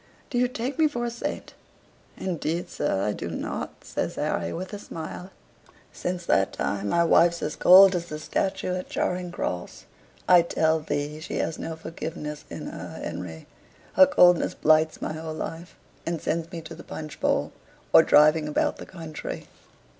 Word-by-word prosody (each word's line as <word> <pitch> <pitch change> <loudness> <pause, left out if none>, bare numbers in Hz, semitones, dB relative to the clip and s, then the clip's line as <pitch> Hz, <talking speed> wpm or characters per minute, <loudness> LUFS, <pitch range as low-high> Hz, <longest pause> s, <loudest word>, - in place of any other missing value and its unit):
Do 245 - +1
you 250 - +3
take 250 +3 -4
me 315 - +6
for 240 -5 -3
a 235 - -2
saint?" 235 - -5 0.6
"Indeed, 170 -1 -3
sir, 100 -10 -1
I 105 - +1
do - - -5
not," - - -5
says - - -3
Harry, - - -1
with 185 +4 -6
a 205 - -5
smile. 165 +1 -7 0.6
"Since 180 -1 -4
that 95 -10 +2
time 100 0 -2
my 170 +7 +3
wife's 170 0 +4
as 150 - -2
cold 190 +1 +8
as 170 -1 -2
the 150 - -5
statue 190 +3 -1
at 180 0 -4
Charing 180 -1 -2
Cross. 90 - -4 0.4
I 180 -1 +8
tell 160 -1 +1
thee 150 0 -3
she 155 - -6
has 160 - -2
no 165 - -4
forgiveness 155 -2 -6
in - - -7
her, - - -7
Henry. 80 -3 -6 0.5
Her 280 - +8
coldness 180 -11 +5
blights 155 0 +3
my - - -2
whole 160 0 -5
life, 165 +2 -6 0.3
and 170 -1 -2
sends 165 +2 -2
me 170 - -6
to 160 +1 -9
the 165 - -11
punch 155 -2 -8
bowl, - - +1 0.4
or - - +10
driving 150 +1 +5
about 150 - 0
the - - -9
country. 165 -4 -7
165 Hz, 175 wpm, -26 LUFS, 155-180 Hz, 0.6 s, or